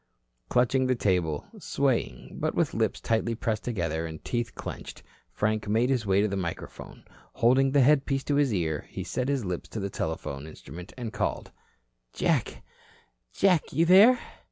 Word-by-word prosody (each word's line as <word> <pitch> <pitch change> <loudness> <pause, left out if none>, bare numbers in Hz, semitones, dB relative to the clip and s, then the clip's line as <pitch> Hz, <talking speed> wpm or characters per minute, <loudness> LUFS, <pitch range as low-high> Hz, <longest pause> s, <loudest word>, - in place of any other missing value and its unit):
Clutching 125 +1 +2
the 130 - +2
table, 90 -9 0
swaying, - - -1
but - - -1
with - - +1
lips - - 0
tightly 115 +1 0
pressed 110 -2 -2
together 85 -8 -2
and 80 -1 -9
teeth 120 -2 -2
clenched, - - -8 0.3
Frank 110 0 -1
made 115 +5 +2
his 120 -5 0
way 95 +1 +4
to 105 - +2
the 100 - -3
microphone. 85 -3 -6 0.3
Holding 130 +3 +4
the 140 +1 +4
headpiece 135 0 +3
to 145 - -1
his 145 -3 +3
ear, 80 -6 -1
he - - -5
set 125 +1 -2
his 135 -6 0
lips 90 -2 -4
to 110 - -5
the 100 -1 -3
telephone 80 -5 -4
instrument 80 +4 -10
and 120 -3 -5
called: - - -2 0.6
"Jack, - - 0 0.7
Jack, 185 -5 +2
you 165 +5 +3
there?" 200 +8 +8
110 Hz, 165 wpm, -27 LUFS, 90-130 Hz, 0.7 s, there